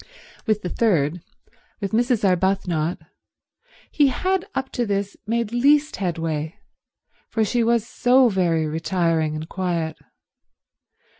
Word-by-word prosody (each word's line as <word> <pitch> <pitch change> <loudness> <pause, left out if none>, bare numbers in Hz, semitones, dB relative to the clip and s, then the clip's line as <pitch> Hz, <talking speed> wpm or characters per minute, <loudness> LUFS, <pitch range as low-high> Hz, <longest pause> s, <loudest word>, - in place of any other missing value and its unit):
With 215 -1 +1
the 180 - -2
third, 175 -8 +1 0.6
with 200 -3 -3
Mrs. 235 -2 +2
Arbuthnot, 180 -3 0 0.9
he 290 -2 +4
had 370 +7 0
up 265 0 -2
to 245 - -1
this 200 -2 -2
made 230 -1 -1
least 285 +5 +3
headway, 165 -4 -2 0.7
for 220 -1 +1
she 235 +3 +1
was 230 -1 +1
so 250 +1 +4
very 175 -6 +1
retiring 165 -1 0
and 155 +1 -5
quiet. 170 -3 -2
195 Hz, 120 wpm, -22 LUFS, 165-235 Hz, 0.9 s, he